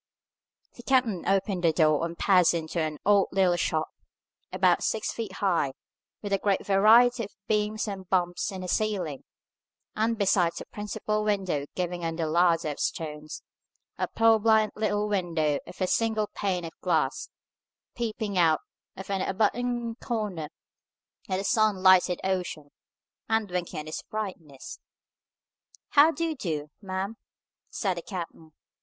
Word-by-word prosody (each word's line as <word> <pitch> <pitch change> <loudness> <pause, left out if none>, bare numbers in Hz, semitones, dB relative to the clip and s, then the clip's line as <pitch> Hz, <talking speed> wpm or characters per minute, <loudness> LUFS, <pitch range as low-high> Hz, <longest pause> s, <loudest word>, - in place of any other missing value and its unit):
The - - -9
captain 240 -9 +1
opened 195 -1 +1
the 165 - +5
door, 155 -1 +3
and 170 0 -4
passed 180 -3 +4
into 165 +1 -3
an 155 -2 -2
odd 200 -1 +4
little 185 -2 +3
shop, 160 -2 -1 0.6
about - - +3
six 220 - -1
feet 220 -5 -5
high, 175 -9 0 0.5
with 200 -1 -2
a 195 - +2
great 200 -1 0
variety 225 +4 +5
of 200 - -15
beams 215 0 0
and 190 -3 -6
bumps 175 -1 0
in 190 -1 -6
the 185 - -5
ceiling, 180 -9 -1 0.7
and, 225 +1 0
besides 185 -4 +2
the - - -6
principal 215 +1 -3
window 190 -9 -1
giving 175 -1 -3
on 165 0 -2
the 165 -1 -1
ladder 165 0 +2
of 145 - -6
stones, 155 -1 -4 0.6
a - - 0
purblind 220 -1 +4
little 210 -1 0
window 165 -7 0
of - - -11
a 185 - +2
single 220 +1 0
pane 185 -4 -2
of 165 - -6
glass, 155 -7 0 0.6
peeping 215 -4 -2
out 160 -3 +4 0.4
of 190 - -8
an 195 -1 0
abutting 235 +4 -1
corner 210 -10 -3 0.8
at 185 - 0
the 195 - -3
sun 215 -1 +3
lighted 185 -1 +5
ocean, 180 -6 -3 0.6
and 220 -3 0
winking 175 -3 -3
at 150 - -12
its 155 - -5
brightness. 185 -10 -7 1.1
"How 295 +2 +6
do 330 +1 -2
you 320 -1 -2
do, 155 - -4
ma'am?" 195 +2 -4 0.5
said 190 -5 -2
the - - -3
captain. 165 -4 -8
190 Hz, 150 wpm, -27 LUFS, 170-215 Hz, 1.1 s, How